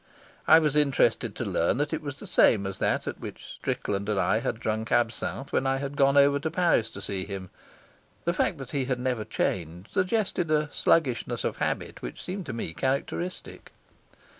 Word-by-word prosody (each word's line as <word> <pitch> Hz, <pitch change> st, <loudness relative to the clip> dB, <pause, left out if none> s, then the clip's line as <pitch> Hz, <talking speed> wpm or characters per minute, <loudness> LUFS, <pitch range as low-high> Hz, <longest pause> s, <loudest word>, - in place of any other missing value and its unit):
I 160 Hz, -, +9 dB
was 150 Hz, -3 st, +2 dB
interested 145 Hz, -3 st, +2 dB
to -, -, -3 dB
learn 85 Hz, +8 st, +1 dB
that 145 Hz, +2 st, -1 dB
it 160 Hz, -, -1 dB
was 145 Hz, -2 st, -6 dB
the -, -, -10 dB
same 100 Hz, -3 st, +4 dB
as 95 Hz, 0 st, -5 dB
that -, -, +1 dB
at -, -, -5 dB
which -, -, -8 dB
Strickland 100 Hz, 0 st, -3 dB
and 105 Hz, -2 st, +1 dB
I 110 Hz, -, +2 dB
had 115 Hz, 0 st, -2 dB
drunk 110 Hz, 0 st, -2 dB
absinthe 120 Hz, +3 st, 0 dB
when 135 Hz, -, +2 dB
I 135 Hz, 0 st, +2 dB
had 140 Hz, +1 st, -4 dB
gone 140 Hz, 0 st, +4 dB
over 140 Hz, 0 st, +5 dB
to 160 Hz, +3 st, -2 dB
Paris 170 Hz, -9 st, +2 dB
to 100 Hz, -3 st, -8 dB
see 95 Hz, -1 st, -2 dB
him. 95 Hz, -2 st, -7 dB, 0.7 s
The 170 Hz, -, +2 dB
fact 175 Hz, -, 0 dB
that 135 Hz, -2 st, -8 dB
he 140 Hz, -3 st, 0 dB
had 125 Hz, -1 st, -1 dB
never 125 Hz, -3 st, -1 dB
changed 90 Hz, -1 st, -3 dB
suggested 185 Hz, -3 st, 0 dB
a 150 Hz, -1 st, +1 dB
sluggishness 140 Hz, -8 st, +1 dB
of -, -, -2 dB
habit -, -, -2 dB
which -, -, -7 dB
seemed 185 Hz, -1 st, -5 dB
to -, -, -3 dB
me 115 Hz, -8 st, -4 dB
characteristic. 140 Hz, -, -3 dB
135 Hz, 195 wpm, -27 LUFS, 110-150 Hz, 0.7 s, I